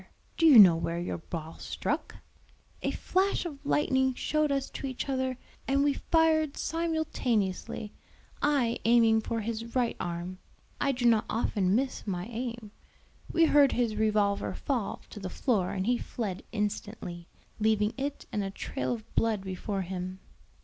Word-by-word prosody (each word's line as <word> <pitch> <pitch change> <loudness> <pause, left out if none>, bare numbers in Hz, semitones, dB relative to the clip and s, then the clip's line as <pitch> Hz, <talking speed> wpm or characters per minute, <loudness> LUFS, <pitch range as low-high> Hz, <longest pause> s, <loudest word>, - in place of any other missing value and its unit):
do 330 - +4
you 285 -6 +9
know 185 -6 +10
where 165 +1 -2
your 175 0 -3
ball 160 -1 -7
struck?" - - -3 0.7
"A - - 0
flash 380 0 0
of 290 -5 -7
lightning 265 -3 +2
showed 305 +1 0
us 275 -1 0
to 275 - -5
each 260 +1 -4
other 260 -2 -1 0.3
and 275 +1 +3
we 290 0 +3
fired 315 -1 +2
simultaneously, 250 - -1 0.5
I 275 -6 +2
aiming 225 -1 +5
for 225 +1 -2
his 230 +2 -5
right 245 -2 +1
arm. 175 +1 -4 0.4
I 280 - +2
do 245 -2 -2
not 225 -2 +4
often 205 -4 +1
miss 260 -2 -1
my 180 -2 -2
aim: 235 -1 -5 0.6
we 335 -1 +5
heard 290 -3 +5
his 235 -3 0
revolver 210 -2 +1
fall 245 -8 -2
to 210 - -8
the 190 -2 -5
floor 200 -3 0
and 190 -1 -2
he 245 +1 +2
fled 205 -4 -4
instantly, 205 -5 -4 0.3
leaving 215 0 +2
it 280 +1 -4
and 205 - -1
a 195 - -2
trail 195 - -3
of 220 -2 -9
blood 220 -4 +1
before 195 +1 -3
him." 185 +1 -5
230 Hz, 155 wpm, -29 LUFS, 200-270 Hz, 0.7 s, know